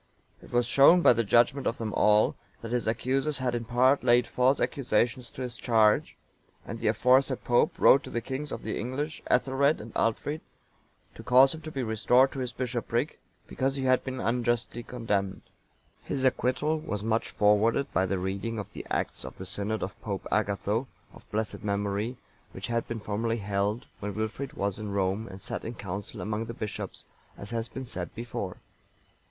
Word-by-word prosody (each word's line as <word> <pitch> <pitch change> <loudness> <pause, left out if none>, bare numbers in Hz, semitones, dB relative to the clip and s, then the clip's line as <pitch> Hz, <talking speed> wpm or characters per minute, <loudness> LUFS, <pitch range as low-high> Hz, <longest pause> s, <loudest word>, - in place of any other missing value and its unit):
(922) - - -14
It 120 - 0
was 120 - +3
shown 140 +8 +6
by - - +8
the 115 0 +1
judgement 120 +5 +3
of 115 - -1
them 110 -2 -4
all, 105 0 +4 0.3
that 115 - -5
his 120 -2 0
accusers 130 +6 0
had 130 -2 -1
in 120 -1 -2
part 130 +4 +3
laid 120 0 +5
false 125 +4 +2
accusations 120 -1 0
to 130 - -7
his 125 -1 -5
charge; 110 -3 +3 0.5
and - - -6
the - - -1
aforesaid 130 +1 +3
Pope 120 0 +2
wrote 135 - +6
to - - -8
the 120 - -1
kings 135 +5 -5
of - - -5
the 110 - -3
English, 140 +6 -3
Ethelred 140 +3 +2
and 110 +1 -9
Aldfrid, 145 +7 -1 0.7
to - - -10
cause 130 +2 +6
him 160 - -8
to 155 - -7
be 135 -3 -3
restored 125 +4 +3
to 135 - -6
his 125 -2 -2
bishopric, 120 +2 -2 0.3
because 135 +1 -1
he 135 - -3
had 130 -1 +3
been 130 -1 -5
unjustly 120 0 0
condemned.(923) 105 -6 -2 0.6
His 135 - -2
acquittal 130 +4 +1
was 105 -10 -4
much 110 +1 0
forwarded 105 +6 +2
by 95 +1 +2
the 95 +1 0
reading 95 +5 -3
of 105 - -6
the - - -6
acts - - -2
of - - -9
the 95 - -7
synod 100 +3 -2
of 95 0 -6
Pope 100 -3 -4
Agatho,(924) 105 +3 0 0.3
of - - -17
blessed 110 0 -3
memory, 105 +3 -1 0.4
which 95 - -5
had 115 +1 -1
been 115 - -3
formerly 110 +2 -2
held, 100 +3 -1
when 105 -1 -4
Wilfrid 110 +6 -3
was 100 -6 -2
in 105 -1 -5
Rome 100 +3 0
and 95 0 -9
sat - - -4
in 115 - -5
council 100 -1 -6
among 110 +1 -2
the 115 0 -7
bishops, 105 -3 -5 0.3
as 100 - -9
has 115 0 -2
been 130 +1 -7
said 90 -8 -5
before. 115 0 -5
115 Hz, 190 wpm, -28 LUFS, 105-130 Hz, 0.7 s, by